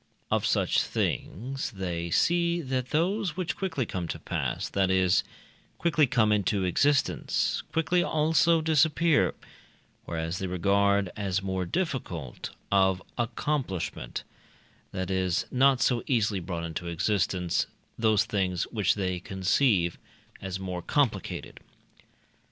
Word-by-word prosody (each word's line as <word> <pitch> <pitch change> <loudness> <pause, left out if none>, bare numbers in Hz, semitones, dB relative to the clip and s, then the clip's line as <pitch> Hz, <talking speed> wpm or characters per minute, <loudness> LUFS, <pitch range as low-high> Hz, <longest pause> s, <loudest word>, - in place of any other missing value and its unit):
Of - - +2
such - - +2
things, 130 +7 -2
they 90 -5 -4
see 170 - +2
that 130 -3 -2
those 180 +2 0
which 180 -3 -2
quickly 160 -10 -2
come 90 -4 -4
to - - -4
pass - - -3
that 95 -1 +1
is, 95 -1 +3 0.5
quickly 160 -4 +3
come 110 -3 +3
into 100 -1 +1
existence 140 +11 +1
quickly 165 +2 +2
also 160 +1 +3
disappear; 160 0 +3 0.7
whereas 85 +1 -3
they 95 - -2
regard 100 +1 +2
as 100 -2 -1
more 95 -2 -2
difficult 115 - -3 0.2
of 95 -1 +3 0.2
accomplishment 120 - -2 0.7
that 95 0 -3
is, 95 -2 0
not 130 0 +4
so 120 -2 +2
easily 110 -6 +1
brought 85 -1 -4
into 85 +1 -5
existence 90 0 0 0.3
those 110 -1 +3
things 95 -4 0
which 105 -6 +2
they 95 -3 -1
conceive 95 -1 +1 0.4
as 95 -1 -4
more 90 -2 -4
complicated. 140 +1 -1
100 Hz, 120 wpm, -28 LUFS, 90-140 Hz, 0.7 s, not